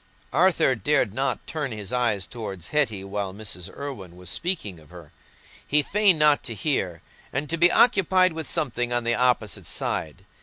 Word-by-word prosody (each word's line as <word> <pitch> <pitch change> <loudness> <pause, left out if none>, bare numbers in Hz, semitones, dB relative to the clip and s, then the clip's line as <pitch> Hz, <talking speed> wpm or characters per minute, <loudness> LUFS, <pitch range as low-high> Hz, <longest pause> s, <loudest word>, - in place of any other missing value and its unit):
Arthur 165 -4 +4
dared 120 -2 +1
not 135 +2 -2
turn 150 -5 -3
his 105 +1 -6
eyes 115 -6 +1
towards 95 -7 -6
Hetty 120 -10 +1
while 100 -1 -4
Mrs. 100 -5 -6
Irwine 120 -12 -8
was 90 0 -7
speaking 165 - -3
of 75 - -19
her. 85 -4 -13 0.6
He 150 +1 +3
feigned 200 0 +3
not 150 -1 +4
to 115 - -4
hear, 95 - -2 0.3
and 140 +3 -2
to - - +2
be 175 +2 +5
occupied 185 -5 +4
with 160 -3 -4
something 120 -6 -1
on 120 0 0
the 120 0 +1
opposite 125 -4 +1
side. - - -3
125 Hz, 175 wpm, -25 LUFS, 100-150 Hz, 0.6 s, be